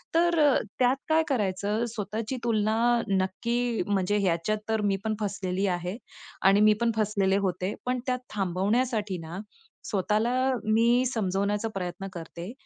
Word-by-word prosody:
तर 340 -1 +3
अ, 290 -3 +5 0.3
त्यात 250 +1 +4
काय 320 0 +4
करायचं? 210 -2 0
स्वतःची 220 +4 -3
तुलना 220 -1 +1 0.3
नक्की 230 +5 0
म्हणजे 200 0 +1
ह्याच्यात 190 +2 +1
तर 220 -1 +1
मी - - +1
पण 220 -1 -1
फसलेली 195 -1 -1
आहे 180 +5 -5 0.5
आणि 200 +1 +4
मी 215 0 +6
पण 235 -1 +3
फसलेले 200 -2 +1
होते. 185 0 -1
पण 250 0 0
त्यात 250 -1 0
थांबवण्यासाठी 205 +2 0
ना, 165 +3 -7 0.5
स्वतःला 215 +3 +1 0.4
मी 240 +3 +4
समजवण्याचा 205 -1 -1
प्रयत्न 180 +1 -4
करते, 170 +3 -7
210 Hz, 135 wpm, -27 LUFS, 190-235 Hz, 0.5 s, मी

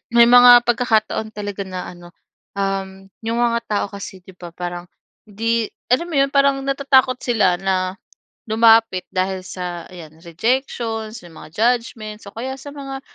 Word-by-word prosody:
may 235 0 +7
mga 245 0 +9
pagkakataon 220 -2 0
talaga 205 -1 -5
na 185 -1 -6
ano, 175 0 -12 0.4
um, 195 -1 -3 0.2
yung 230 +1 -1
mga 235 -1 +2
tao 205 -1 -1
kasi, 200 -2 -9
'di 185 0 -16
ba, 175 -2 -10
parang 175 0 -6 0.4
hindi, 225 +2 -2 0.2
alam 260 +8 +2
mo 320 - -5
'yon, 275 0 +3
parang 275 -1 +3
natatakot 270 -2 +2
sila 210 -7 +2
na 185 0 -1 0.5
lumapit 225 -3 +4
dahil 185 0 -2
sa, 180 -2 -6
ayan, 165 -3 -13
rejections, 225 - -2
may 170 - -14
mga - - -12
judgments, 225 -2 -1
o - - -20
kaya 260 +4 -5
sa 270 +2 -10
mga 275 -2 -7
215 Hz, 155 wpm, -20 LUFS, 185-245 Hz, 0.5 s, mga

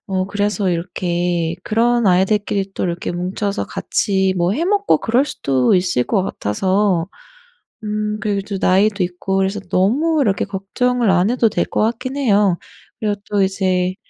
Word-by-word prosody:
어 190 -1 -1
그래서 205 0 -1
이렇게 175 -1 -1
그런 235 0 +2
아이들끼리 195 +1 +1
또 - - -3
이렇게 175 -1 -3
뭉쳐서 190 +3 -3
같이 190 -2 0
뭐 175 +1 +1
해 310 +10 -1
먹고 405 +2 +2
그럴 245 +4 +2
수도 130 - +1
있을 180 -8 +1
거 195 - +1
같아서. 185 - 0 0.8
음 210 0 -2
그리고 205 -2 -1
또 200 - -3
나이도 200 +2 +3
있고 180 +2 -2
그래서 195 +2 0
너무 285 - +2
이렇게 200 -8 +1
걱정을 220 +4 -1
안 190 +4 +3
해도 235 -3 +2
될 - - 0
것 - - -2
같긴 240 +4 -1
해요. 205 -8 +3 0.4
그리고 210 -2 0
또 205 -1 +1
이제 185 -1 0
195 Hz, 310 characters per minute, -19 LUFS, 185-215 Hz, 0.8 s, 나이도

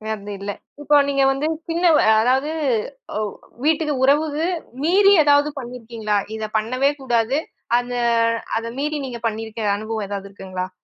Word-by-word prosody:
அது 205 0 -8
இல்ல. 200 +1 -4 0.3
இப்போ 295 0 +4
நீங்க 275 -1 +2
வந்து 280 +3 -1 0.2
சின்னவ 335 -1 +3 0.3
அதாவது. 265 +6 +2 0.7
ஒ - - 0 0.4
வீட்டுக்கு 310 -1 +2
உறவுக்கு 300 +3 +2 0.4
மீறி 395 +4 +5
எதாவது 290 0 +4
பண்ணிருக்கீங்களா? 230 -4 -3 0.2
இதப் 220 0 -5
பண்ணவே 255 +6 +1
கூடாது. 240 +2 +1 0.4
அந்த 245 0 -5 0.6
அத 230 - -3
மீறி 300 +1 -1
நீங்கப் 235 -2 -3
பண்ணிருக்க 220 0 -5 0.2
அனுபவம் 215 -1 -4
ஏதாவது 200 -1 -5
இருக்குங்களா? 185 -1 -5
250 Hz, 135 wpm, -21 LUFS, 220-295 Hz, 0.7 s, மீறி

